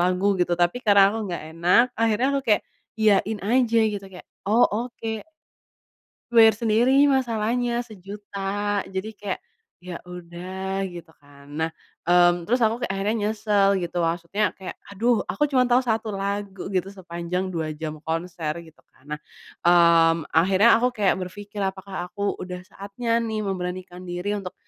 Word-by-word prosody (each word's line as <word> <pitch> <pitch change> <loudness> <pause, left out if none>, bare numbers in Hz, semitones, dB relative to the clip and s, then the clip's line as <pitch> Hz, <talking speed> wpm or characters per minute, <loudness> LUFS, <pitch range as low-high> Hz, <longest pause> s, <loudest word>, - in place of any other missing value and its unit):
lagu 180 +2 +1
gitu, 175 0 +1
tapi 175 +7 +1
karena 200 -2 +6
aku 225 - -3
nggak 175 - -4
enak 180 +8 +5
akhirnya 230 +2 +2
aku - - 0
kayak 210 - +4 0.4
iyain 215 0 +3
aja 230 +1 +3
gitu 200 -1 -5
kayak, 180 - -12 0.2
"Oh, 230 +3 +5 0.2
oke." 225 -3 -6 1.1
Bayar 225 -2 +7
sendiri 240 +6 +3
masalahnya, 240 -1 0
sejuta. 205 -2 -10 0.5
Jadi 205 +3 -6
kayak, 200 -3 -4 0.4
"Ya 180 -1 -6
udah," 185 +2 -5
gitu 175 -3 -10
kan. 140 0 -18
Nah, 160 0 0 0.4
mmm, 175 -1 +4
terus 245 +3 +1
aku 225 +1 +2
kayak 240 -5 -2
akhirnya 205 +3 0
nyesel 210 -2 +2
gitu, 175 0 -3
maksudnya 170 +5 0
kayak, 190 - -8 0.2
"Aduh 235 +3 +1
aku 295 -1 0
cuman 255 -3 +3
tahu 245 +1 +4
1 220 -3 -1
lagu 195 -1 -4
gitu 185 -1 0
sepanjang 180 -1 -4
2 160 -3 -3
jam 155 0 -6
konser," 165 -1 -3
gitu 160 -2 -18 0.2
kan. 145 +3 -18
Nah, 150 0 -4 0.5
mmm, 170 -2 +5
akhirnya 190 +8 +5
aku 250 +1 +1
kayak 200 -5 +2
berpikir, 205 +3 -8
"Apakah 190 -1 -5
aku 200 +2 -3
udah 180 0 -6
saatnya 205 +5 -3
nih 220 -2 -2
memberanikan 185 -1 -5
diri 175 +3 -3
untuk 185 -2 -7
195 Hz, 155 wpm, -24 LUFS, 175-220 Hz, 1.1 s, Bayar